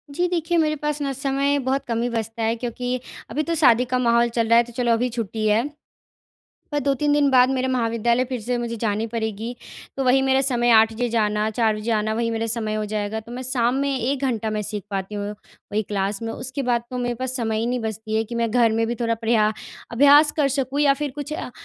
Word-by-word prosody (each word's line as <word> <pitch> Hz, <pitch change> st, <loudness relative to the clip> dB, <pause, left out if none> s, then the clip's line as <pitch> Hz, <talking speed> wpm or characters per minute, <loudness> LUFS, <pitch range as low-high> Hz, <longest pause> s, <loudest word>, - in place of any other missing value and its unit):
जी, 355 Hz, +3 st, +1 dB
देखिए 345 Hz, -1 st, 0 dB
मेरे 305 Hz, -2 st, +2 dB
पास 300 Hz, 0 st, -3 dB
ना 280 Hz, -1 st, -1 dB
समय 275 Hz, +1 st, 0 dB
बहुत 270 Hz, +1 st, -1 dB
कम 230 Hz, -1 st, -1 dB
ही 240 Hz, -, 0 dB
बचता 225 Hz, 0 st, -3 dB
है 225 Hz, +1 st, +1 dB
क्योंकि 245 Hz, +1 st, -3 dB, 0.3 s
अभी 305 Hz, -, -1 dB
तो 335 Hz, +2 st, -1 dB
शादी 250 Hz, -6 st, +4 dB
का 255 Hz, 0 st, -1 dB
माहौल 235 Hz, -1 st, +3 dB
चल 230 Hz, -1 st, 0 dB
रहा 230 Hz, +1 st, +5 dB
है, 235 Hz, -, +6 dB
तो 240 Hz, 0 st, -13 dB
चलो 240 Hz, -1 st, 0 dB
अभी 245 Hz, +2 st, +1 dB
छुट्टी 225 Hz, -2 st, -3 dB
है। 220 Hz, +5 st, +2 dB, 1.1 s
पर 290 Hz, -, +1 dB
2-3 280 Hz, +1 st, +1 dB
दिन 290 Hz, -1 st, +3 dB
बाद 255 Hz, 0 st, +5 dB
मेरे 260 Hz, -1 st, 0 dB
महाविद्यालय 235 Hz, 0 st, +1 dB
फिर 255 Hz, -2 st, -3 dB
से 245 Hz, +3 st, -2 dB
मुझे 235 Hz, -1 st, -3 dB
जानी 215 Hz, 0 st, -1 dB
पड़ेगी। 225 Hz, 0 st, -4 dB, 0.4 s
तो 270 Hz, -, -1 dB
वही 260 Hz, +1 st, +4 dB
मेरा 265 Hz, 0 st, +3 dB
समय 245 Hz, -3 st, +2 dB
8 225 Hz, 0 st, +6 dB
बजे 240 Hz, +2 st, -2 dB
जाना, 215 Hz, -2 st, +1 dB
4 220 Hz, -1 st, +1 dB
बजे 215 Hz, +2 st, -4 dB
आना, 215 Hz, 0 st, 0 dB
वही 230 Hz, +1 st, -1 dB
मेरा 225 Hz, 0 st, -2 dB
समय 220 Hz, -1 st, -2 dB
हो 215 Hz, 0 st, -1 dB
जाएगा। 210 Hz, +1 st, -3 dB
तो 230 Hz, +2 st, -12 dB
मैं 250 Hz, +1 st, -5 dB
शाम 245 Hz, -1 st, 0 dB
में 280 Hz, -1 st, 0 dB
1 260 Hz, +3 st, -1 dB
घंटा 225 Hz, -4 st, -1 dB
मैं 215 Hz, 0 st, -2 dB
सीख 210 Hz, 0 st, -4 dB
पाती 195 Hz, +1 st, -4 dB
हूँ 205 Hz, 0 st, -3 dB, 0.4 s
वही 215 Hz, +1 st, +1 dB
क्लास 200 Hz, -1 st, -2 dB
में। 225 Hz, 0 st, -3 dB
उसके 260 Hz, +2 st, -4 dB
बाद 240 Hz, -2 st, +1 dB
तो 250 Hz, -, -4 dB
मेरे 245 Hz, -1 st, -1 dB
पास 255 Hz, +2 st, -2 dB
समय 225 Hz, -3 st, -1 dB
ही 225 Hz, -, -1 dB
नहीं 250 Hz, +1 st, -1 dB
बचती 220 Hz, 0 st, -4 dB
है 220 Hz, -, +1 dB
कि 230 Hz, +2 st, -8 dB
मैं 230 Hz, -1 st, 0 dB
घर 230 Hz, -1 st, +3 dB
में 225 Hz, +1 st, +1 dB
भी 235 Hz, -, -2 dB
थोड़ा 230 Hz, -1 st, +1 dB
प्रया 225 Hz, -1 st, +2 dB, 0.4 s
अभ्यास 285 Hz, +5 st, +6 dB
कर 295 Hz, -3 st, +3 dB
सकूँ 275 Hz, +1 st, -1 dB
या 280 Hz, -2 st, +5 dB
फिर 290 Hz, +1 st, -3 dB
कुछ 295 Hz, 0 st, -6 dB
अ, 305 Hz, -, -5 dB
235 Hz, 245 wpm, -23 LUFS, 220-265 Hz, 1.1 s, है